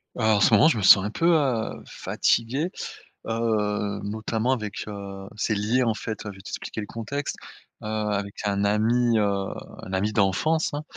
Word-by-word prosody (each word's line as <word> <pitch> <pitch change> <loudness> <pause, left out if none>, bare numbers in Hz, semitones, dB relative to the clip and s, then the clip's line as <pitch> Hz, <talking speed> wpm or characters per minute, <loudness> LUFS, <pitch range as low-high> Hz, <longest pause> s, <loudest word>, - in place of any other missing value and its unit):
Alors 110 -2 +3
en - - +1
ce 115 - +5
moment 105 +8 +7
je 160 - +2
me 105 - -2
sens 95 0 +8
un 105 - -2
peu, 165 - -2
heu, 130 -7 0
fatigué, 130 +9 0 0.6
heu, 105 -3 -1
notamment 110 +3 -1
avec, 110 -6 -3
heu, 100 -2 -7
c'est 110 0 0
lié, 110 +5 +1
en 115 -3 +1
fait, 110 -1 -5
enfin, 105 - -6
je 95 - -14
vais - - -12
t'expliquer 110 - -5
le - - -5
contexte, 130 +6 -4 0.5
heu, - - -9
avec 105 -2 -2
un 100 0 0
ami, 115 +3 +2
heu 105 - +3 0.6
un - - -8
ami 100 +3 0
d'enfance, 105 - +2
hein. 150 - -4
110 Hz, 185 wpm, -25 LUFS, 100-115 Hz, 0.6 s, sens